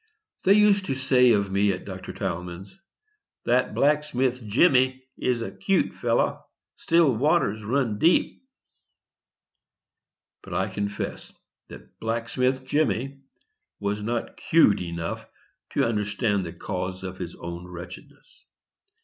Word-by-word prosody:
They 195 - +7
used 205 -2 +4
to 135 - -2
say 130 -2 +4
of 100 -2 0
me 100 +1 +3
at 90 - -5
Dr. - - -7
Tilghman's, 90 - -5 0.7
"That 125 +2 +1
blacksmith 135 -4 +1
Jemmy 130 - +3
is 120 -2 -1
a - - -5
'cute 195 -2 0
fellow; - - 0 0.3
still 165 -6 +3
water 150 +1 +2
runs 115 -2 0
deep." 170 +2 +2 2.0
But - - -8
I 95 +2 0
confess 100 +1 -4 0.4
that - - -14
"blacksmith 125 +3 -1
Jemmy" 140 -1 -1 0.6
was 100 +1 -2
not 115 +2 -3
'cute 160 - +4
enough 85 -1 -5 0.5
to - - +2
understand 105 -2 0
the - - -7
cause 90 +1 -5
of 95 0 -6
his 90 -2 -6
own 85 +1 -7
wretchedness. 90 0 -12
115 Hz, 120 wpm, -25 LUFS, 95-135 Hz, 2.0 s, They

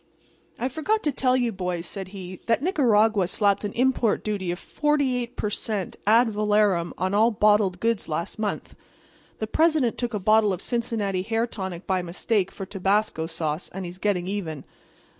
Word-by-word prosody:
"'I 255 - -1
forgot 380 - -1
to 295 - +1
tell 255 -1 +2
you, 245 -2 +1
boys,' 180 -3 -3
says 190 +1 -6
he, 185 -1 -9
'that 230 +3 +2
Nicaragua 225 - +3
slapped 200 +1 +1
an 205 - -2
import 250 -3 +1
duty 200 -4 -2
of 175 - -1
48 260 -2 0
per 210 - -2
cent. 210 -3 -3
ad 230 +2 +5
valorem 205 -4 +2
on 185 +1 -1
all 220 +3 +5
bottled 210 -4 +3
goods 230 0 0
last 165 +6 -4
month. 210 -2 -3 0.6
The 220 - -2
President 305 -1 +2
took 240 -2 -2
a - - -1
bottle 215 +1 +4
of 180 - -4
Cincinnati 225 -6 -1
hair 225 +4 0
tonic 190 -6 -6
by 185 -1 0
mistake 185 +3 -1
for 195 - -7
tabasco 195 -3 0
sauce, 160 -1 -3
and 190 0 -6
he's 175 +1 -8
getting 190 -3 0
even. 180 -7 -4
210 Hz, 175 wpm, -25 LUFS, 185-230 Hz, 0.6 s, ad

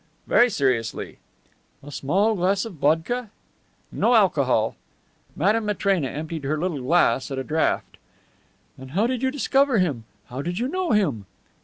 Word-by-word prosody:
"Very 245 - +4
seriously." 130 - -1 0.6
"A 145 - -10
small 195 +11 +1
glass 195 +1 +1
of 225 - -7
vodka?" 165 - 0 0.6
"No 245 - +2
alcohol." 135 - +2 0.6
Madame 210 +6 +1
Matrena 195 -7 +1
emptied 155 +2 -5
her 145 +3 -1
little 160 -4 -2
glass 135 -3 +2
at 135 - -4
a 135 - -2
draught. 160 +3 -1 0.8
"And 130 0 -10
how 200 +6 +2
did 250 0 -1
you 265 - +1
discover 275 -1 +2
him? 145 - 0 0.2
How 130 +2 -6
did 175 +4 -4
you 240 +4 -1
know 370 +4 -2
him?" 140 - 0
175 Hz, 150 wpm, -24 LUFS, 140-220 Hz, 0.8 s, Very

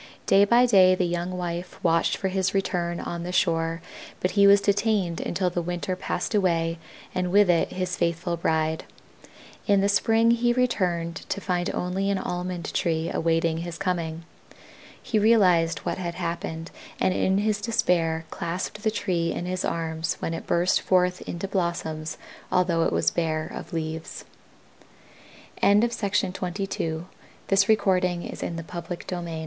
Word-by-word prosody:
Day 200 +1 +5
by 235 +4 +5
day 190 -6 +6
the 185 - 0
young 175 +1 -2
wife 175 0 -4
watched 165 -1 +2
for 190 - -1
his 190 +1 0
return 175 -3 -1
on 170 0 -4
the 175 +1 -4
shore, 165 -1 +1 0.4
but 185 - 0
he 200 -1 +5
was 200 0 +7
detained 200 -3 +1
until 180 0 -1
the 175 - -1
winter 175 +2 -3
passed 180 +1 -3
away 165 -4 +1 0.3
and 180 -1 -1
with 200 -1 +5
it 170 - +1
his 185 -1 -2
faithful 170 0 0
bride. 160 -1 0 0.8
In 200 -2 +4
the 200 - +3
spring 225 +3 +3
he 240 +1 +2
returned 180 -9 0
to - - -1
find 180 -2 -1
only 190 +2 -1
an 200 - +1
Almond 180 -1 -4
tree 165 -2 0
awaiting 165 0 +1
his 170 -1 -5
coming. 165 -3 -2 0.8
He 220 - 0
realized 180 -7 +3
what - - -2
had 170 -2 -4
happened 170 -1 -4 0.3
and 185 - +2
in 190 +1 +1
his 210 0 0
despair 170 -8 +1
clasped 180 +5 -4
the 220 - +2
tree 180 -6 -1
in 175 - -4
his 185 0 -2
arms 160 -1 -2
when 165 - -3
it - - -6
burst 175 +2 +2
forth 180 -1 +2
into 175 +3 -4
blossoms 165 -4 -2 0.3
although 170 -2 +2
it - - +1
was - - +2
bare 155 -2 -1
of - - -8
leaves. 160 -1 -5 1.4
[Illustration: 205 -3 +2
From 180 -2 -4
Nature, 165 -4 -3 0.4
by 195 - +2
Chicago 195 -2 +4
Colortype 175 -2 -2
Co. 170 +1 -5
FLOWERING 175 +1 -5
AL 160 -1 -4
180 Hz, 160 wpm, -25 LUFS, 165-195 Hz, 1.4 s, was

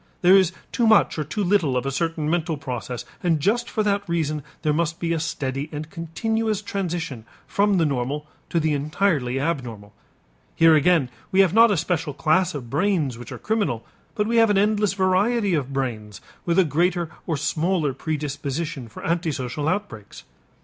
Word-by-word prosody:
There 180 +2 +7
is 190 -3 +4 0.2
too 235 -2 +1
much 220 -6 +4
or - - 0
too 200 +8 -3
little 175 -9 +2
of 125 - -2
a 135 - -1
certain 160 +1 -1
mental 165 -1 0
process 125 -2 -5 0.2
and 165 -3 +2
just 230 +10 +1
for 215 - 0
that 200 -2 0
reason 155 -3 -1 0.2
there 150 -2 +2
must 165 +1 -1
be 170 -1 0
a 165 - -1
steady 140 -2 -3
and 155 +1 -6
continuous 215 +6 -2
transition 170 - -3 0.2
from 200 -1 +2
the 165 - +3
normal 140 +1 -2 0.2
to 170 - +1
the 155 -1 +1
entirely 145 -3 0
abnormal. 120 -9 -3 0.6
Here 165 0 +6
again 155 -4 +3 0.2
we 190 - +5
have 190 -3 +3
not 230 +2 +7
a 205 - +2
special 160 -3 -1
class 170 +3 +2
of 130 -4 -6
brains 150 - 0
which 120 - -9
are - - -6
criminal; 200 - -1 0.3
but 210 - +1
we 230 +2 +1
have 225 -1 +5
an 205 - +3
endless 210 0 +2
variety 200 +2 +2
of 140 -4 -1
brains 115 -7 -3 0.3
with 170 - +2
a 190 - +7
greater 170 +2 0 0.2
or 160 -4 0
smaller 160 0 0
predisposition 145 -1 -4
for 110 - -10
antisocial 150 -5 -2
outbreaks. 160 - -4
165 Hz, 180 wpm, -23 LUFS, 140-190 Hz, 0.6 s, There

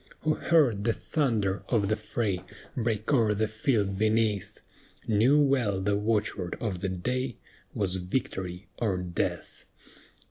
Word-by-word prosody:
Who 155 +1 +2
heard 140 -13 +3
the 115 - +2
thunder 110 - 0
of 105 -5 +2
the 110 - +2
fray 105 -3 -2 0.3
Break 115 +1 -1
o'er 110 -5 +3
the 110 +2 +1
field 110 -3 0
beneath, 110 -2 +1 0.5
Knew 115 +7 +4
well 130 -9 +2
the 100 +1 +1
watchword 105 -4 -1
of 100 -6 -2
that 90 -1 -3
day 125 -2 -1 0.4
Was 95 -2 0
"Victory 90 -1 -3
or 100 -5 +1
Death." 90 -1 -3
105 Hz, 135 wpm, -28 LUFS, 95-120 Hz, 0.5 s, Knew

